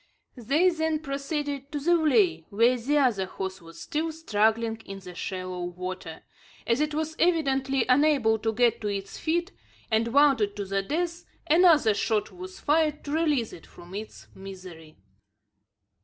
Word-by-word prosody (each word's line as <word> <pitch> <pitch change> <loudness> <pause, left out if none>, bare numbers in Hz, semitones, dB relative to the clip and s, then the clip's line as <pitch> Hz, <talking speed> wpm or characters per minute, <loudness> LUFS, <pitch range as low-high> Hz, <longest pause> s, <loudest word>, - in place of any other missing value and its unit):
They 285 +9 +2
then 320 -2 0
proceeded 280 0 -4
to 295 - -3
the 320 +5 +1
vley, 220 - +3
where 230 +5 +3
the 265 +5 0
other 230 -9 +2
horse 190 0 -6
was 165 0 -13
still 320 +1 -2
struggling 225 -6 0
in 195 -3 -9
the 185 -2 -10
shallow 185 0 -5
water. 180 -2 -7 0.4
As 235 +4 +1
it 300 0 -1
was 315 0 -2
evidently 270 -6 +2
unable 255 -4 +3
to 225 +1 0
get 235 +1 +2
to 210 - -2
its 195 -1 -4
feet, 345 +4 -1 0.4
and 220 +1 +2
wounded 260 -6 +3
to 205 -1 -4
the 195 +1 -1
death, 340 - -3 0.2
another 320 - +5
shot 210 +1 -1
was 370 +1 -10
fired 300 0 +1
to 285 - -6
release 295 -7 0
it 165 - -12
from 175 +1 -14
its 215 +2 -8
misery. 185 -5 -11
245 Hz, 155 wpm, -26 LUFS, 195-305 Hz, 0.4 s, another